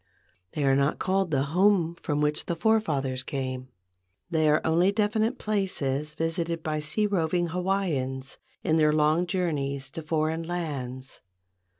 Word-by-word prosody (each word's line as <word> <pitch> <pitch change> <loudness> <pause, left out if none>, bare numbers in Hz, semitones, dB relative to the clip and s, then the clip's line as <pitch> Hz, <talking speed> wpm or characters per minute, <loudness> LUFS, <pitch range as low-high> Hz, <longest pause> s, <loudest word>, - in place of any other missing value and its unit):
They 150 - -1
are 135 -1 +4
not 140 +1 +2
called 190 -1 0
the 135 -3 +1
home 185 -3 +4
from 150 -3 -2
which 150 0 0
the 170 - -1
forefathers 155 -10 +1
came. 130 -1 -4 0.6
They 155 -2 +3
are 150 - +4
only 170 +4 +3
definite 220 +3 +1
places 150 - -1
visited 165 0 -2
by 155 -1 -1
sea 155 +8 0
roving 175 -3 +1
Hawaiians 165 -8 -2 0.2
in 160 - +2
their 150 -1 +4
long 155 +3 +3
journeys 140 -7 -2
to 165 - -6
foreign 155 +1 0
lands. 140 -7 -5
160 Hz, 140 wpm, -27 LUFS, 140-180 Hz, 0.6 s, are